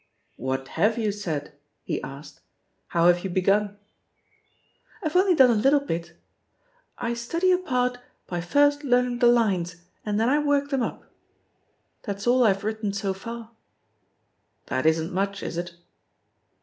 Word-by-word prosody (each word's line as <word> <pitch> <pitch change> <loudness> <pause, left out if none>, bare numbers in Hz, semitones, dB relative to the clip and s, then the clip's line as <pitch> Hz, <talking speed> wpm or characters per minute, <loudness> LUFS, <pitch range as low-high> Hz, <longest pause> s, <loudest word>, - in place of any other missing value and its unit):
"What 130 +1 -3
have 220 +3 +1
you 220 -3 0
said?" 160 -8 -4 0.3
he - - -3
asked. 140 +2 -10 0.5
"How 170 0 +1
have 175 0 +4
you 190 - -3
begun?" 200 +3 +1 1.3
"IVe 310 - -2
only 370 0 +4
done 260 -5 +6
a - - +4
little 270 +7 +4
bit. 170 -12 -4 0.8
*I 235 -1 -2
study 335 +11 0
a 360 - +3
part 250 -7 -1 0.3
by 175 -1 -4
first 285 - +2
learning 250 -2 +1
the 245 - +5
lines, 195 -8 +2 0.3
and 210 0 -1
then 225 - +2
I 285 +4 +3
work 285 -1 +1
them 270 -2 +1
up/ - - -4 1.0
That's 200 -2 -5
all 250 +1 +4
IVe 195 -3 +2
written 215 -1 -2
so 200 -1 -2
far." 230 +4 -8 1.1
"That 130 +4 -1
isn't 160 +3 +1
much, 195 +1 -2
is - - -4
it?" 175 0 -5
215 Hz, 150 wpm, -25 LUFS, 180-250 Hz, 1.3 s, done